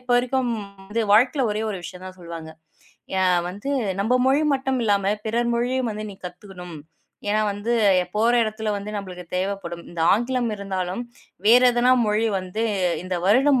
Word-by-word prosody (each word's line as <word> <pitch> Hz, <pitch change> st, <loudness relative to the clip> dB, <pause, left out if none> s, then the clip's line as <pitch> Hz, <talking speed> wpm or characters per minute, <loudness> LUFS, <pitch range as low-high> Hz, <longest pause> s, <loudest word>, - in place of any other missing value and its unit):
இப்ப 250 Hz, 0 st, -10 dB
வரைக்கும் 250 Hz, -1 st, 0 dB, 0.6 s
வாழ்க்கையில 250 Hz, +3 st, +4 dB
ஒரே 215 Hz, +1 st, -2 dB
ஒரு 195 Hz, -, -4 dB
விஷயம் 185 Hz, +1 st, -8 dB
தான் 185 Hz, 0 st, -10 dB
சொல்லுவாங்க. 165 Hz, -2 st, -8 dB, 0.7 s
அ -, -, +3 dB, 0.3 s
வந்து 205 Hz, +9 st, -5 dB, 0.3 s
நம்ம 225 Hz, +4 st, 0 dB, 0.2 s
மொழி 290 Hz, +3 st, +3 dB
மட்டும் 265 Hz, -1 st, -1 dB
இல்லாம 200 Hz, -1 st, +2 dB
பிறர் 235 Hz, +2 st, 0 dB
மொழியும் 245 Hz, 0 st, 0 dB
வந்து 215 Hz, +1 st, -5 dB
நீ -, -, -13 dB
கத்துக்கணும். 180 Hz, -2 st, -10 dB, 0.5 s
ஏன்னா 215 Hz, +1 st, +2 dB
வந்து 205 Hz, +4 st, -2 dB, 0.4 s
போற 225 Hz, +3 st, +3 dB
இடத்துல 215 Hz, 0 st, -3 dB
வந்து 200 Hz, +1 st, -6 dB
நமளுக்குத் 180 Hz, -3 st, -7 dB
தேவப்படும் 185 Hz, -3 st, -3 dB
இந்த 175 Hz, -, -6 dB
ஆங்கிலம் 240 Hz, +2 st, 0 dB
இருந்தாலும் 190 Hz, +2 st, -3 dB, 0.4 s
வேற 240 Hz, +3 st, +8 dB
எதுனா 245 Hz, +1 st, +4 dB
மொழி 215 Hz, +2 st, +1 dB
வந்து 185 Hz, +4 st, -4 dB, 0.4 s
இந்த 185 Hz, -1 st, -3 dB
வருடம் 260 Hz, +5 st, +4 dB
215 Hz, 155 wpm, -23 LUFS, 185-240 Hz, 0.7 s, வேற